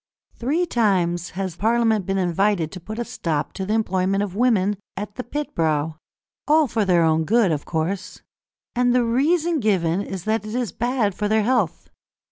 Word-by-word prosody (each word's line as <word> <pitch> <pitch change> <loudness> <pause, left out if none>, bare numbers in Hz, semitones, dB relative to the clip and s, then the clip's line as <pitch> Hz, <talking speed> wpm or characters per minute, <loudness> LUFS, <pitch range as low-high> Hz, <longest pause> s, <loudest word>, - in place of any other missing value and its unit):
Three 300 +9 0
times 180 - +1
has 190 -3 -3
Parliament 220 0 +1
been 195 0 0
invited 180 -2 +1
to 185 - -8
put 215 +6 -8
a 240 - -2
stop 155 -8 -3
to 190 -1 -4
the 215 - +1
employment 195 -2 +1
of 195 -2 -5
women 210 -4 +2 0.2
at 205 +1 -5
the 250 - -5
pit 295 +5 -4
brow, 155 -1 0 0.5
all 310 +1 +5
for 225 -5 0
their 170 -4 +4
good, 200 +4 +3
of 150 -2 -2
course. 175 +3 -3 0.5
And 245 0 +3
the 245 -1 +3
reason 310 +7 +2
given 190 -5 +1
is 190 -3 -6
that 220 +2 0
it 215 +2 -6
is 245 -3 -1
bad 240 -4 0
for 210 +3 -2
their 215 0 +2
health. 225 -7 0
205 Hz, 180 wpm, -22 LUFS, 180-235 Hz, 0.5 s, all